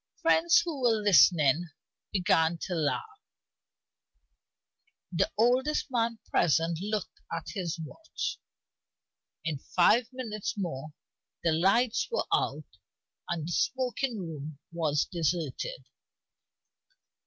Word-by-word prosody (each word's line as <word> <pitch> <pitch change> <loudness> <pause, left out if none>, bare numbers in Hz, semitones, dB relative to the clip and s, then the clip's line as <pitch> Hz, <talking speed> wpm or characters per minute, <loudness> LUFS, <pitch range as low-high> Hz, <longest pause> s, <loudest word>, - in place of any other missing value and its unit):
Friends 335 +1 +5
who 310 -6 -4
were 230 -3 +3
listening 165 - +5 0.4
began 170 -3 +2
to 185 - -3
laugh. 410 - -2 1.9
The 185 +2 +1
oldest 260 +6 +2
man 230 -2 0
present 165 0 +2
looked 210 -1 -3
at 165 -1 -4
his 180 -5 -3
watch. 325 - -5 1.1
In 155 -4 -2
five 220 - +3
minutes 220 -6 -4
more 155 -5 -4 0.5
the 165 - +3
lights 195 +9 +2
were 470 - -1
out - - -1 0.5
and 165 -2 -2
the - - -4
smoking 255 - 0
room 155 -5 -6
was 155 -4 0
deserted. 170 - -2
185 Hz, 100 wpm, -29 LUFS, 165-245 Hz, 1.9 s, Friends